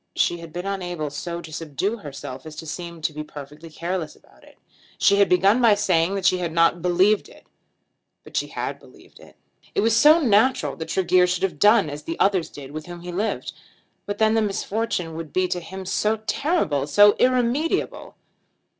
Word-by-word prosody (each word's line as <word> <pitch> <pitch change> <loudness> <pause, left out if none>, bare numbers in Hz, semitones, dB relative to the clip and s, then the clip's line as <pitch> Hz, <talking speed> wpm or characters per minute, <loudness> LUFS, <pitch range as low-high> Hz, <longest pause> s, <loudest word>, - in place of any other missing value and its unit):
She 175 - +1
had 165 -1 -10
been 175 +3 -6
unable 175 -6 -3
so 170 +4 -5
to 160 -2 -11
subdue 165 - -3
herself 140 - -8
as 155 - -9
to 160 - -8
seem 170 0 -7
to 155 - -1
be 150 +1 -5
perfectly 150 +2 -11
careless 170 0 -4
about - - -24
it. - - -19 0.4
She 200 - +4
had 200 - +4
begun 195 +6 +4
by 225 -4 +6
saying 185 -3 +1
that 195 -2 -3
she 185 -1 +3
had 170 -2 -2
not 165 +1 +2
believed 185 +4 +2
it; - - -18 0.8
but - - -14
she - - 0
had - - -5
believed - - -19
it. - - -17 0.4
It - - +2
was 225 +1 +3
so 300 +7 +7
natural 250 -2 +2
that 160 - -6
Tregear 185 -1 +3
should 180 0 -2
have 175 -7 -1
done 205 -3 +5
as 145 0 -6
the 165 +2 -6
others 195 -4 +2
did 140 -1 -10
with 155 +1 -7
whom 175 -1 -9
he 175 0 -7
lived! 205 +5 -3 0.5
But 205 0 -3
then 220 0 +3
the 225 - +2
misfortune 205 -4 -2
would 160 -1 -7
be 185 0 +1
to 180 - -1
him 190 +3 -8
so 210 +4 0
terrible, 215 - 0
so 205 +6 +6
irremediable! 255 +8 0
180 Hz, 200 wpm, -23 LUFS, 160-205 Hz, 0.8 s, so